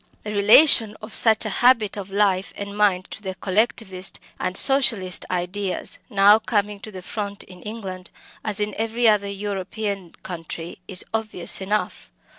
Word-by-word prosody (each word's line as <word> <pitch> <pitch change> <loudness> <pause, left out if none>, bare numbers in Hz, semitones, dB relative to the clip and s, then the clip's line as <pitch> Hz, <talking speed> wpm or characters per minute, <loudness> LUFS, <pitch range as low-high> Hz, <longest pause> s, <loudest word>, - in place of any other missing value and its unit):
The 210 - -5
relation 215 +1 +6
of 215 +1 -10
such 220 -1 +4
a - - -2
habit 240 -4 +4
of 200 -2 -7
life 195 -1 0
and 200 0 -6
mind 200 -3 +2
to - - -9
the 190 -2 -5
Collectivist 190 -1 -1 0.2
and 185 +1 -1
Socialist 250 -10 +4
ideas 185 +2 -3
now 205 0 +5
coming 210 -2 -1
to 215 - -9
the 185 -2 -9
front 200 0 -5
in 180 -1 -15
England, 195 -4 -7 0.3
as 210 -1 -2
in 210 0 -1
every 225 +1 +1
other 205 -2 +3
European 200 -1 -5
country, 165 -1 -7
is 185 -2 -3
obvious 215 -5 -2
enough. 210 +2 -3
205 Hz, 155 wpm, -22 LUFS, 190-215 Hz, 0.3 s, relation